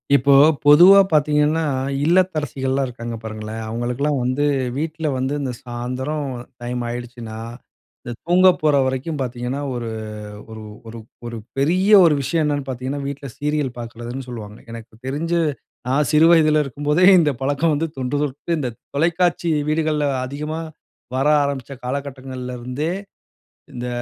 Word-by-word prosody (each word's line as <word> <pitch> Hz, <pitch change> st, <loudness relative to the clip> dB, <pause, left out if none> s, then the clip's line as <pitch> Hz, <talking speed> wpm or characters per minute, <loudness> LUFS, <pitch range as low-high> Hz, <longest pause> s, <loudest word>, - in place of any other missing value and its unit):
இப்போ 140 Hz, +1 st, +4 dB, 0.3 s
பொதுவா 175 Hz, +7 st, +9 dB
பார்த்தீங்கன்னா, 150 Hz, +1 st, +3 dB, 0.4 s
இல்லத்தரசிகள்லாம் 150 Hz, -6 st, +1 dB
இருக்காங்க, 120 Hz, -1 st, -6 dB
பாருங்களேன்! 110 Hz, 0 st, -6 dB
அவுங்களுக்கெல்லாம் 125 Hz, +5 st, -1 dB
வந்து 130 Hz, +4 st, 0 dB, 0.3 s
வீட்ல 160 Hz, +1 st, -3 dB
வந்து, 130 Hz, +2 st, -1 dB
இந்த 135 Hz, -2 st, -2 dB
சாயந்தரம் 130 Hz, +4 st, -4 dB, 0.3 s
டைம் 120 Hz, 0 st, -3 dB
ஆகிடுச்சுனா, 120 Hz, -2 st, -6 dB, 0.7 s
இந்த 120 Hz, -, -6 dB
தூங்க 180 Hz, +2 st, +6 dB
போற 150 Hz, -2 st, +3 dB
வரைக்கும் 130 Hz, +4 st, -2 dB
பார்த்தீங்கன்னா, 125 Hz, +2 st, -3 dB
ஒரு 120 Hz, -2 st, -4 dB, 0.6 s
ஒரு 110 Hz, 0 st, -9 dB, 0.3 s
ஒரு 115 Hz, -, -9 dB, 0.3 s
ஒரு 115 Hz, 0 st, -6 dB, 0.2 s
பெரிய 180 Hz, +9 st, +2 dB
ஒரு 155 Hz, -3 st, +4 dB
விஷயம் 155 Hz, +4 st, 0 dB
என்னென்னு 145 Hz, -2 st, -1 dB
பார்த்தீங்கன்னா, 130 Hz, +3 st, -4 dB
வீட்ல 140 Hz, 0 st, -6 dB
சீரியல் 150 Hz, -2 st, -1 dB
பாக்குறதுன்னு 120 Hz, +2 st, -7 dB
சொல்லுவாங்க. 110 Hz, -4 st, -8 dB
எனக்கு 115 Hz, 0 st, -10 dB
தெரிஞ்சு, 165 Hz, +5 st, -1 dB, 0.5 s
நான் 140 Hz, +3 st, +2 dB
சிறு 155 Hz, +2 st, +6 dB
வயதுல 155 Hz, -2 st, +4 dB
இருக்கும்போதே, 145 Hz, +6 st, +1 dB
இந்த 150 Hz, -3 st, +2 dB
பழக்கம் 145 Hz, +4 st, +1 dB
வந்து 160 Hz, +3 st, -1 dB
தொன்று 130 Hz, +3 st, -1 dB
தொட்டு, 145 Hz, +4 st, -3 dB
இந்த 125 Hz, -4 st, -2 dB, 0.3 s
தொலைக்காட்சி 170 Hz, +2 st, +1 dB, 0.2 s
வீடுகள்ல 155 Hz, -2 st, +1 dB, 0.2 s
அதிகமா 150 Hz, +4 st, -4 dB, 0.6 s
வர 135 Hz, +3 st, +2 dB, 0.2 s
ஆரம்பிச்ச 140 Hz, -2 st, -4 dB
காலகட்டங்கள்லருந்தே, 130 Hz, +1 st, -4 dB, 0.8 s
இந்த 125 Hz, 0 st, -5 dB
140 Hz, 125 wpm, -21 LUFS, 125-155 Hz, 0.8 s, பொதுவா